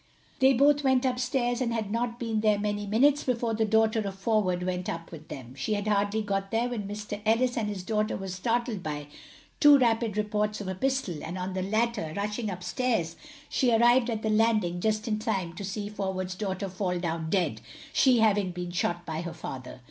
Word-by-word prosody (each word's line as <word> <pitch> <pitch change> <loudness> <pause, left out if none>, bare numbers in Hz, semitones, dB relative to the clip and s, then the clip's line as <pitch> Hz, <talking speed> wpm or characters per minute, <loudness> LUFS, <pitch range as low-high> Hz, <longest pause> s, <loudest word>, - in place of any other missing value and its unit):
They 265 +1 +6
both 285 +3 +4
went 260 -1 +3
up 250 -1 0
stairs, 245 -1 0
and 240 -2 0
had 220 -3 -2
not 235 +1 -1
been 225 -2 -1
there 215 -1 +3
many 205 0 -2
minutes 275 +8 +3
before 235 -2 0
the 220 0 +1
daughter 220 +1 +3
of 200 -2 -3
Forward 195 -3 +1
went 180 0 -2
up 165 0 -5
with 155 -2 -10
them. 125 -2 -8
She 140 +11 -2
had 205 +1 -3
hardly 205 +1 +1
got 195 -1 -2
there 230 +3 0
when 215 -5 -4
Mr 205 0 -5
Ellis 235 +3 +2
and 220 -3 -1
his 195 -3 -5
daughter 215 +1 0
were 195 - -6
startled 225 +3 -1
by 150 -2 -4 0.5
two 290 -1 +8
rapid 230 -4 +1
reports 210 0 0
of 205 - -6
a 190 - -2
pistol, 235 - -1
and 175 +3 -5
on 185 +1 -3
the 190 - -2
latter 215 -4 0
rushing 210 +2 -2
up 185 -1 -6
stairs 180 -6 -1 0.3
she 250 -2 +2
arrived 240 +2 +5
at 220 -2 -3
the 220 - +1
landing 215 -5 +2
just 215 +1 0
in 215 -1 0
time 195 -6 -2
to 190 - -7
see 205 +1 -4
Forward's 190 -3 -3
daughter 190 0 -3
fall 185 -1 -2
down 165 -2 -2
dead, 160 - 0 0.3
she 250 -4 +4
having 205 -3 +3
been 175 0 -5
shot 175 0 -1
by 160 0 -3
her 170 -1 -5
father. 130 -5 -7
210 Hz, 210 wpm, -28 LUFS, 185-230 Hz, 0.5 s, two